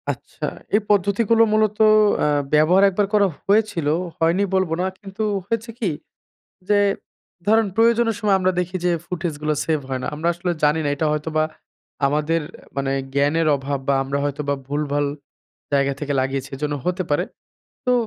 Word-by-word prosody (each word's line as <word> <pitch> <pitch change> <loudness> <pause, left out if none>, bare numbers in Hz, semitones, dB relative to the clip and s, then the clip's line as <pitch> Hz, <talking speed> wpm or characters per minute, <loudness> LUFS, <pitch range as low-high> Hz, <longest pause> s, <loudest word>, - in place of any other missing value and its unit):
আচ্ছা, - - -5 0.3
এই 215 - +3
পদ্ধতিগুলো 205 +3 +3
মূলত 215 -1 +2 0.4
অ্যা - - +2 0.3
ব্যবহার 160 +6 +5
১ - - -8
বার 205 -1 +3
করা 205 -1 +5 0.2
হয়েছিল। 200 -7 +2 0.3
হয়নি 170 +4 +2
বলবো 185 -4 +1
না। - - 0
কিন্তু 200 +1 -6 0.2
হয়েছে 230 +1 -2
কি? 210 - 0 0.8
যে 205 - +4 0.7
ধরেন 220 +1 +4
প্রয়োজনের 230 -1 +3
সময় 205 -3 +3
আমরা 185 0 +1
দেখি 180 +1 -3
যে 180 - +3 0.2
ফুটেজগুলো 155 -4 -2
সেভ 155 -2 0
হয় 130 -1 -2
না। - - -3
আমরা 160 +3 -1
আসলে 175 +1 -3
জানি 150 +2 +3
না - - 0
এটা 155 - 0
হয়তোবা 155 +1 0 0.6
আমাদের 150 +3 +1 0.4
মানে 135 0 0 0.2
জ্ঞানের 145 +4 +2
অভাব 140 +1 -3
বা, 140 - +4
আমরা 135 +1 -2
হয়তোবা 145 0 -1
ভুলভাল 145 0 -1 0.7
জায়গা 140 0 +2
থেকে 145 -1 -2
লাগিয়েছি, 135 0 -2
এজন্য 150 +1 -2
হতে 180 +1 0
পারে। 145 - +2 0.6
তো 250 - +2
165 Hz, 160 wpm, -22 LUFS, 145-200 Hz, 0.8 s, ব্যবহার